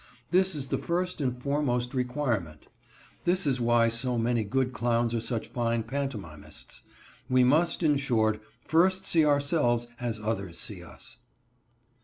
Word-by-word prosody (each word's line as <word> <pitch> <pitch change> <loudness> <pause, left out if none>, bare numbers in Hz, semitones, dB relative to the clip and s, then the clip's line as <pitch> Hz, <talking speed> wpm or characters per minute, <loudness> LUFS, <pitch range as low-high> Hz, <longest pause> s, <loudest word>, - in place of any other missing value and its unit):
This 185 0 +3
is 135 -3 -4
the - - 0
first 180 -1 -2
and 125 -2 -1
foremost 125 -3 0
requirement. 125 - -2 0.5
This 180 +1 +2
is 130 -3 +1
why 120 0 +4
so 120 +2 -1
many 115 0 +1
good 130 +4 0
clowns 120 0 +1
are 115 - +1
such 115 -1 -3
fine 115 -1 -1
pantomimists. 110 - -6 0.5
We 130 0 +4
must, 160 +7 +3
in 150 -3 +4
short, 110 -6 +1 0.2
first 185 +4 +3
see 165 -2 +3
ourselves 140 -5 +2
as 120 -3 -3
others 100 -5 -3
see - - -4
us. - - -12
125 Hz, 145 wpm, -28 LUFS, 115-145 Hz, 0.5 s, why